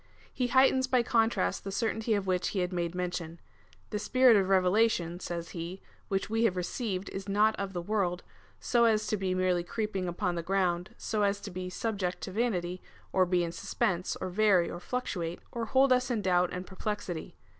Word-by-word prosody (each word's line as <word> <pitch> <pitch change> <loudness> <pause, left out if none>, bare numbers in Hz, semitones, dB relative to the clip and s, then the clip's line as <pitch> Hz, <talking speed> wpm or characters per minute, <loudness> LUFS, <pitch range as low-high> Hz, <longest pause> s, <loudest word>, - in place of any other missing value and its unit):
He 250 - 0
heightens 260 +1 +4
by 255 -2 +3
contrast 225 - +1
the 195 - -5
certainty 220 +1 0
of 200 -1 -1
which 185 -1 0
he 190 - -1
had 180 +1 -2
made 170 -1 -2
mention. 175 -2 -3 0.2
" - - -30
The 210 - -1
S]3irit 240 0 +5
of 190 - -2
revelation," 185 -2 +2
says 170 -2 -5
he, 170 +2 -6 0.2
" - - -34
which 195 -1 0
we 225 +1 0
have 185 -5 +1
received, 190 +1 -3
is 195 +1 -6
not 210 +2 +3
of 195 -1 -4
the 175 -1 -3
world, 180 -3 -1 0.4
so 235 -2 +3
as 215 -2 +3
to - - 0
be 190 -2 -1
merely 185 -1 +1
creep 215 +3 -3
ing 185 -1 -1
upon 175 +1 -1
the 170 - -2
ground, 180 -1 0
so 215 -2 -2
as 200 0 +2
to 200 - -7
be 180 0 -5
subject 190 -2 -2
to - - -5
vanity, 185 -5 -1 0.3
or 185 -1 +4
be 175 -1 +2
in 170 - -2
suspense, 185 -1 -1
or 185 - -3
vary 195 -2 +3
or 175 - -6
fluctuate, 175 -6 -3
or 235 -1 -3
hold 265 +3 +4
us 250 0 +1
in 225 -4 -1
doubt 180 -1 +3
and 180 0 -5
per 190 - -12
plexity. 200 -6 -4
190 Hz, 210 wpm, -30 LUFS, 180-220 Hz, 0.4 s, S]3irit